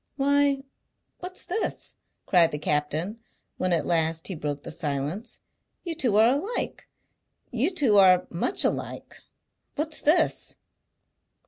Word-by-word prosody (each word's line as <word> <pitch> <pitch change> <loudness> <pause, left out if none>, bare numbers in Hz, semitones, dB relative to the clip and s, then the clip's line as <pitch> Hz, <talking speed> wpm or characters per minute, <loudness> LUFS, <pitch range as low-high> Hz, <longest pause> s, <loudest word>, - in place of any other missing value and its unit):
"Why, 280 0 +2 0.6
what's 365 +1 -7
this?" 415 +5 -2 0.3
cried 175 -3 +5
the 150 - -3
captain, 150 +8 -1 0.4
when 185 0 0
at 170 -2 +2
last 165 0 0
he - - -2
broke 145 -3 -4
the - - -7
silence. 150 - -3 0.4
"You 340 - -3
two 250 -10 +1
are 220 +2 +6
alike. 425 +9 -4 0.6
You 250 +7 +1
two 270 - +3
are 185 -2 +6
much 175 - 0
alike. - - -3 0.6
What's 310 +1 -2
this?" 310 +4 +2
205 Hz, 125 wpm, -26 LUFS, -, 0.6 s, are